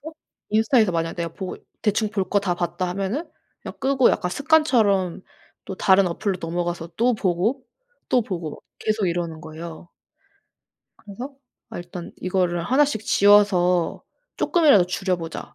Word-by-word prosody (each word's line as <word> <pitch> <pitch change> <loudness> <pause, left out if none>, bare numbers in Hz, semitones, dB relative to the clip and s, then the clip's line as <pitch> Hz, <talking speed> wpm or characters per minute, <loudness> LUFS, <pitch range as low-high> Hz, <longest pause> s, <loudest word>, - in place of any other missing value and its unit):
그래서 315 +3 -9 0.4
인스타에서 220 -2 +3
만약 165 0 -1
내가 170 -1 -4
보고 190 0 -6 0.3
'대충 215 0 +1
볼 195 -4 -2
거 205 - +2
다 180 -3 -1
봤다.' 180 +1 -2
하면은 200 - -3 0.3
그냥 - - -8
끄고 265 -2 +3
약간 180 - -1
습관처럼 220 - +2 0.4
또 190 - -6
다른 190 0 +4
어플로 185 +2 -2
넘어가서 170 0 -3
또 245 +2 +2
보고, 215 +6 -1 0.4
또 250 -2 +3
보고 175 -7 -5
뭐 - - -10 0.2
계속 215 -3 0
이러는 170 -2 -3
거예요. 160 +2 -9 1.1
그래서 245 +7 -9 0.3
아 225 - -7
일단 175 0 -8
이거를 180 -2 -1
1 270 +9 +4
씩 220 -7 -3
지워서 190 -4 +3 0.3
쪼끔이라도 290 - +4
줄여보자. 180 -3 -3
190 Hz, 315 characters per minute, -23 LUFS, 175-220 Hz, 1.1 s, 다른